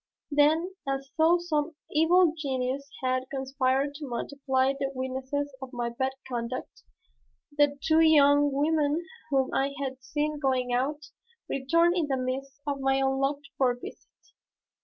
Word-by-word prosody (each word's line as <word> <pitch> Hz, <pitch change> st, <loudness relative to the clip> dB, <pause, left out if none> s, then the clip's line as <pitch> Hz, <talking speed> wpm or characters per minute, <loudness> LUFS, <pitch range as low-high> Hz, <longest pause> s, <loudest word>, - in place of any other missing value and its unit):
Then, 315 Hz, +5 st, +3 dB, 0.2 s
as 275 Hz, 0 st, -3 dB
though 325 Hz, +2 st, +5 dB
some 320 Hz, -2 st, -2 dB, 0.2 s
evil 330 Hz, +2 st, +4 dB
genius 275 Hz, -2 st, -2 dB
had 255 Hz, 0 st, 0 dB
conspired 270 Hz, +1 st, 0 dB
to 290 Hz, 0 st, -7 dB
multiply 265 Hz, +1 st, 0 dB
the 275 Hz, 0 st, -2 dB
witnesses 265 Hz, +2 st, -3 dB
of 265 Hz, -1 st, -7 dB
my 240 Hz, -1 st, -2 dB
bad 260 Hz, +3 st, -1 dB
conduct, 240 Hz, 0 st, -5 dB, 0.7 s
the 290 Hz, -1 st, +3 dB
two 320 Hz, 0 st, +4 dB
young 290 Hz, -2 st, +5 dB
women 300 Hz, +3 st, +1 dB, 0.2 s
whom 270 Hz, -2 st, +1 dB
I 275 Hz, +1 st, 0 dB
had 265 Hz, -1 st, -4 dB
seen 300 Hz, +2 st, -2 dB
going 255 Hz, -3 st, 0 dB
out, 290 Hz, +5 st, -1 dB, 0.4 s
returned 335 Hz, +6 st, +2 dB
in 335 Hz, -5 st, 0 dB
the 270 Hz, -2 st, 0 dB
midst 265 Hz, +2 st, -4 dB
of 285 Hz, -1 st, -2 dB
my 270 Hz, 0 st, +2 dB
unlooked 270 Hz, +1 st, 0 dB
for 250 Hz, -2 st, +3 dB
visit. 245 Hz, -, -11 dB
275 Hz, 140 wpm, -28 LUFS, 265-295 Hz, 0.7 s, though